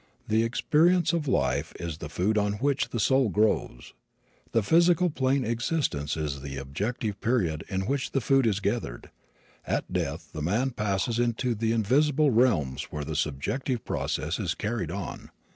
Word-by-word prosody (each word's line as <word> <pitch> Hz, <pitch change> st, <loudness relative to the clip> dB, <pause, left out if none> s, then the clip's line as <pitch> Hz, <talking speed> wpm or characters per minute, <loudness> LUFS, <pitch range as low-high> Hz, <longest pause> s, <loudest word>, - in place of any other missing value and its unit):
The 110 Hz, +1 st, +3 dB
experience 160 Hz, +8 st, +3 dB
of 160 Hz, -4 st, -1 dB
life 70 Hz, -, 0 dB
is 85 Hz, -3 st, -5 dB
the 75 Hz, -, -6 dB
food 95 Hz, +7 st, 0 dB
on 105 Hz, -1 st, +1 dB
which 125 Hz, +1 st, 0 dB
the 120 Hz, -, -3 dB
soul 130 Hz, +2 st, +3 dB
grows. 100 Hz, -, 0 dB, 0.6 s
The 115 Hz, -, +2 dB
physical 170 Hz, -, +4 dB
plane 135 Hz, -1 st, +1 dB
existence 115 Hz, -, -1 dB
is 75 Hz, -3 st, -3 dB
the 70 Hz, 0 st, -6 dB
objective 100 Hz, -, -3 dB
period 90 Hz, -11 st, 0 dB
in 95 Hz, 0 st, -1 dB
which 135 Hz, +3 st, -1 dB
the 135 Hz, -, 0 dB
food 135 Hz, 0 st, +3 dB
is 100 Hz, -3 st, +1 dB
gathered. 100 Hz, -, -3 dB, 0.5 s
At -, -, -2 dB
death -, -, -2 dB
the 75 Hz, -, -5 dB
man 110 Hz, -, +1 dB
passes 105 Hz, +1 st, -1 dB
into 120 Hz, +1 st, +1 dB
the 110 Hz, +1 st, -1 dB
invisible 140 Hz, +6 st, +3 dB
realms 105 Hz, -, +2 dB
where 75 Hz, -1 st, -5 dB
the 80 Hz, +1 st, -4 dB
subjective 80 Hz, -, -2 dB
process -, -, -2 dB
is -, -, -1 dB
carried 105 Hz, -6 st, -2 dB
on. 100 Hz, +2 st, -6 dB
110 Hz, 160 wpm, -27 LUFS, 85-130 Hz, 0.6 s, physical